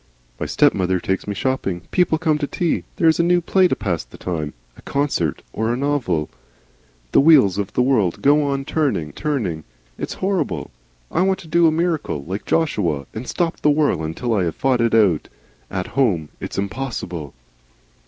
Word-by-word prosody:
My - - -2
stepmother 95 0 +2
takes 95 +3 -2
me 100 - -3
shopping, 100 -8 -1
people 180 -3 +2
come 155 -2 +1
to 145 - -1
tea, 170 +1 -1
there 165 - +2
is 160 - +4
a - - +4
new 175 +1 +4
play 185 +2 +3
to - - 0
pass 90 -5 -2
the - - -15
time, 80 -5 -4 0.2
or - - -18
a - - -12
concert, 135 - -1
or 110 +1 0
a 120 - -1
novel. 130 - 0 0.8
The - - +5
wheels 135 - +5
of 100 - -3
the 125 - +2
world 110 -10 +1
go 145 +2 +5
on 140 -1 -1
turning, 130 - -1
turning. 115 - -2 0.4
It - - -2
is - - -4
horrible. 190 -1 -2 0.4
I - - +1
want 190 0 +2
to 170 - -13
do 170 +1 +4
a - - +4
miracle 160 - -1
like 95 +4 -5
Joshua 95 - 0
and 115 +3 -6
stop 170 -2 -1
the 150 - +4
whirl 145 - +2
until 80 +10 -2
I 95 -4 +2
have 80 - -2
fought 130 -3 +1
it 115 -1 +2
out. 100 -8 +3 0.4
At 95 -1 -3
home 95 - +1
It's - - -6
impossible." 100 - -4
125 Hz, 195 wpm, -21 LUFS, -, 0.8 s, The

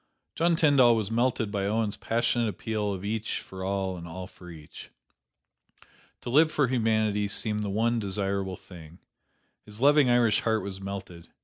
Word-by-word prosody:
John 170 +1 +2
Tyndall 140 -7 +5
was 110 -2 -2
melted 115 -2 0
by 100 -1 -1
Owen's 110 0 0
passionate 115 0 0
appeal 105 -1 -3
of 95 0 -5
each 110 +1 -2
for 95 0 -9
all 95 -1 -2
and 85 0 -8
all 90 +2 -7
for 90 -1 -14
each. 80 -3 -12 1.3
To 120 - -5
live 155 +4 +5
for 145 -3 +2
humanity 110 -4 +1
seemed 105 +1 -1
the 105 - -3
one 115 +4 +1
desirable 100 -2 -2
thing. 85 -2 -13 0.7
His 105 0 -11
loving 145 0 +5
Irish 120 -3 +4
heart 110 -2 0
was 95 -1 -6
melted. 95 -3 -7
105 Hz, 165 wpm, -27 LUFS, 95-115 Hz, 1.3 s, Tyndall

